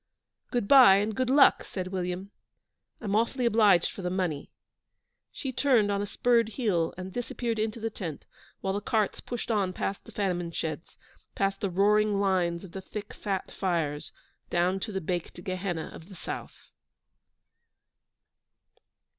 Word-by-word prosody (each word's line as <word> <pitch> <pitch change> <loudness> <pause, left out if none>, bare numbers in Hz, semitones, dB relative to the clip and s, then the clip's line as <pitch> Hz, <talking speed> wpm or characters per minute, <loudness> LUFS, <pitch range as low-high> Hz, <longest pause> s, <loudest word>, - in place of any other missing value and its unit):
'Good 240 -5 -1
bye, 255 -7 +9
and 210 +2 0
good 255 +2 0
luck,' 275 +1 +6
said 185 -1 -5
William. 185 +1 -3 0.7
'I'm 205 -3 -1
awfully 235 +3 +1
obliged 210 -7 +4
for - - -8
the 180 - -1
money.' 180 -6 -2 0.8
She 265 - -4
turned 235 -7 +3
on 200 0 0
a 205 - -3
spurred 235 +1 +2
heel 200 -8 0
and 185 0 -7
disappeared 235 -2 -3
into 220 +1 -1
the 225 0 -3
tent, 165 -8 -6 0.4
while 190 - -1
the 205 - -2
carts 215 -1 0
pushed 240 -1 -4
on 195 -4 +1
past 195 - -3
the - - -12
famine 180 -4 -1
sheds, 160 +1 -5 0.4
past 195 0 0
the 200 - 0
roaring 205 +2 +3
lines 180 -3 +1
of 190 - -10
the 190 - -6
thick, 205 +2 -7
fat 195 -3 -3
fires, 165 -6 -2 0.4
down 180 +2 +1
to 215 - -4
the 190 -1 -2
baked 175 +1 -4
Gehenna 185 -3 -3
of 165 - -12
the 195 - -11
South. - - -8
195 Hz, 155 wpm, -28 LUFS, 180-215 Hz, 0.8 s, bye